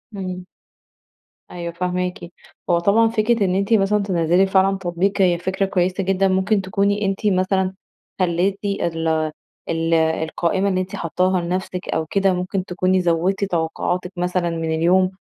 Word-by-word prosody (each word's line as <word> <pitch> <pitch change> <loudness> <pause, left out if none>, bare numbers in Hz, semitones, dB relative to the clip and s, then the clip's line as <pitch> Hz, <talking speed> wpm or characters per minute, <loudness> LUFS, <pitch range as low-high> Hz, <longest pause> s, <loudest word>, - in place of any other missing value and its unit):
إمم. 185 -2 -5 1.1
أيوه، 170 -1 -5
فاهماكِ. 180 +1 -2 0.5
هو 170 -1 +4
طبعًا 205 +6 +4
فكرة 225 -1 +1
إن 185 -1 0
أنتِ 200 +3 +1
مثلًا 205 0 +3
تنزِّلي 175 -1 +2
فعلًا 195 0 +2
تطبيق 190 +2 -1
هي 180 -2 +4
فكرة 190 +2 -1
كويّسة 185 0 0
جدًا. 195 +1 +2
ممكن 190 +2 +1
تكوني 200 +2 0
أنتِ 195 +2 -2
مثلًا 185 -1 +1 0.5
خلّيتِ 185 +2 +1
ال 170 -5 -1 0.6
ال 165 0 0
القائمة 165 +4 +1
اللي 185 -1 0
أنتِ 185 - -6
حاطاها 180 +2 0
لنفسك 180 +1 -4
أو 160 - -1
كده، 195 +3 +1
ممكن 180 +1 -2
تكوني 185 0 +1
زوّدتِ 175 +3 +1
توقعاتِك 180 0 -2
مثلًا 180 0 0
من 165 -1 -3
اليوم، 185 +3 +3
185 Hz, 145 wpm, -21 LUFS, 175-195 Hz, 1.1 s, هو